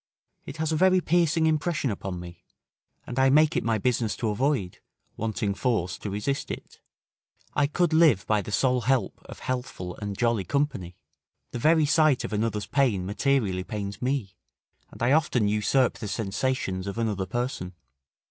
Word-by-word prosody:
It 150 - -7
has 160 0 -1
a - - +1
very 185 +3 +4
piercing 170 -2 +2
impression 155 -4 0
upon 95 -2 -5
me; 85 -1 -11 0.6
and 125 +1 -4
I 135 0 +5
make 150 +2 +4
it - - +1
my 115 -1 +1
business 115 0 0
to 115 - -2
avoid, 120 -4 -1 0.4
wanting 110 -2 -2
force 95 -2 -1
to 105 - -5
resist 105 +8 -2
it. - - -8 0.7
I 145 - +2
could 165 +2 +1
live 155 - +5
by 105 -1 +2
the 100 - -8
sole 125 +3 +2
help 130 +2 0
of - - -10
healthful 125 -8 -4
and 100 -2 -5
jolly 115 -4 +1
company: 95 - -2 0.5
the 120 - -4
very 155 +4 +4
sight 155 -2 +3
of - - -5
another's 105 -1 -1
pain 110 -8 +1
materially 105 -3 0
pains 100 -1 -5
me, 125 -7 -2 0.5
and - - -7
I 120 - +3
often 140 -8 +2
usurp 105 +5 +1
the 105 - -5
sensations 100 -1 -2
of 100 - -5
another 105 -5 -1
person. 120 -7 -3
120 Hz, 165 wpm, -26 LUFS, 100-140 Hz, 0.7 s, I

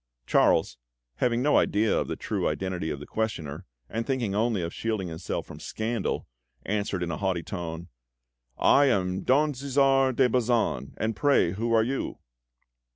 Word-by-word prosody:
Charles, - - +3 0.4
having 120 0 +1
no 150 - +5
idea 105 +1 +2
of - - 0
the - - -3
true - - -2
identity 95 -3 -3
of 70 - -4
his 75 - -9
questioner, 90 -7 -3 0.2
and 115 - -3
thinking 120 -6 -1
only 110 -3 +1
of 85 - -4
shielding 110 -5 -2
himself 80 0 -4
from - - -11
scandal, 110 -1 -3 0.4
answered 100 -3 -1
in 85 - -3
a 80 - -3
haughty 95 -4 -1
tone: 85 -1 -5 0.7
"I 145 - +5
am 95 -7 +1
Don 145 +3 +3
Cæsar 135 -1 +2
de 130 0 +4
Bazan! 115 - 0
And 110 0 -1
pray, 140 -9 +3
who 115 +5 -2
are 110 -1 +5
you?" 135 +4 -3
110 Hz, 160 wpm, -27 LUFS, 90-125 Hz, 0.7 s, no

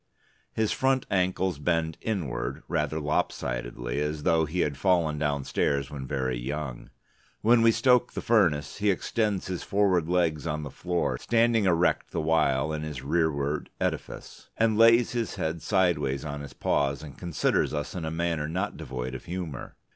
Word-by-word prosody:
His 110 -1 0
front 130 -1 +1
ankles 95 -3 +1
bend 80 0 0
inward 95 - -3
rather 80 - -1
lopsidedly, - - -2
as 75 0 -2
though 80 -1 +3
he 85 +4 -1
had 70 -2 0
fallen 85 -5 +2
downstairs 70 -1 0
when 70 -3 -6
very 65 -3 -1
young. 65 0 -5 0.5
When 115 +2 +5
we 115 0 +6
stoke 125 +1 +3
the - - -3
furnace, 85 -11 +2
he 105 0 +1
extends 105 +1 0
his 90 -2 -4
forward 95 -5 +1
legs 85 -4 +1
on 75 -1 -2
the 70 - -6
floor 90 -1 -1
(standing 115 -2 +2
erect 90 -1 +2
the 85 - -3
while 80 -2 +2
in 75 - -3
his 75 -4 -6
rearward 75 -1 0
edifice) - - -4
and 110 -1 +3
lays 115 +1 +6
his 120 -2 -2
head 80 +1 -2
sideways 80 -9 +1
on 75 -1 -5
his 70 - -9
paws, 70 +1 0
and 70 -4 -9
considers 85 -3 0
us 75 -1 -3
in 90 - -4
a 80 - -2
manner 80 -2 -1
not 95 +5 -2
devoid 65 0 -5
of 65 - -7
humour. 85 -4 -6
80 Hz, 165 wpm, -27 LUFS, 75-95 Hz, 0.5 s, we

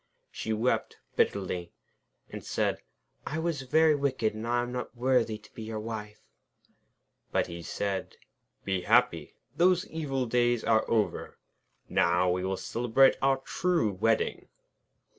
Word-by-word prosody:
She 110 - -4
wept 110 +4 0 0.2
bitterly, 90 -3 0 0.5
and - - -8
said: - - -1 0.5
'I 155 - -3
was 160 -3 -1
very 155 +4 +4
wicked, 135 -6 0
and 110 +2 -6
I 120 0 +1
am 120 - -5
not 125 0 -5
worthy 120 -3 +2
to 105 - -20
be - - -9
your 110 0 -4
wife.' 105 -1 -7 1.1
But - - +2
he 85 0 -8
said: 95 +3 -3 0.5
'Be 95 -2 0
happy! 90 -6 +2 0.2
Those 180 +2 +3
evil 135 -5 -2
days 120 0 +2
are 110 -1 +2
over. 110 -2 -1 0.5
Now 90 +1 +2
we 90 +1 -1
will 95 0 -1
celebrate 120 +6 +3
our 135 0 +3
true 170 - 0
wedding.' 110 +4 0
115 Hz, 140 wpm, -29 LUFS, 105-135 Hz, 1.1 s, very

